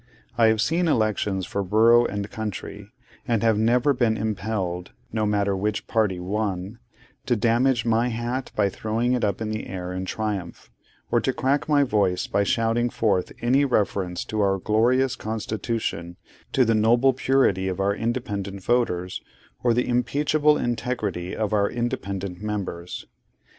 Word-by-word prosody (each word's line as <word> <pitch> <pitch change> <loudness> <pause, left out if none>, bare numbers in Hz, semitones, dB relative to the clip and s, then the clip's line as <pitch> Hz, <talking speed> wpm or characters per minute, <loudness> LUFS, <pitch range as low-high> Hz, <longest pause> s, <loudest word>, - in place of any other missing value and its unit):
I 115 -1 +5
have 110 -1 +3
seen 170 +7 +1
elections 105 - 0
for 100 - -3
borough 115 +5 +5
and 100 0 -4
county, 105 -2 -6 0.4
and 115 -2 +1
have 110 -2 +3
never 125 +6 +3
been 120 -4 +1
impelled 100 -4 -3 0.2
(no 110 -1 0
matter 100 -1 +1
which 105 +2 -2
party 105 -5 0
won) 100 +2 -3 0.5
to 120 - +3
damage 120 +2 +2
my 115 +1 +2
hat 120 +2 -3
by 105 -2 +3
throwing 110 +5 -1
it 125 - 0
up 100 0 0
into 110 0 -2
the - - -8
air 90 -1 -5
in 95 +1 -3
triumph, 100 -4 -4 0.4
or - - +3
to - - +1
crack 140 +3 0
my 145 -1 +5
voice 100 -8 +1
by 100 - +1
shouting 115 +3 +1
forth 100 -6 0
any 130 +4 +4
reference 100 -8 0
to 110 -1 -2
our 95 -1 +2
Glorious 120 +6 +2
Constitution, 110 -6 -3 0.3
to 130 - +3
the 115 - +2
noble 120 +5 +4
purity 130 -8 +2
of 95 0 -3
our 100 +1 +2
independent 105 -5 -3
voters, 90 -7 0 0.4
or, 120 - +4
the 125 +2 +2
unimpeachable 145 +5 +2
integrity 110 -7 -2
of 110 -1 -2
our 100 -1 +2
independent 100 -7 -3
members. 95 -5 -4
110 Hz, 155 wpm, -24 LUFS, 100-120 Hz, 0.5 s, I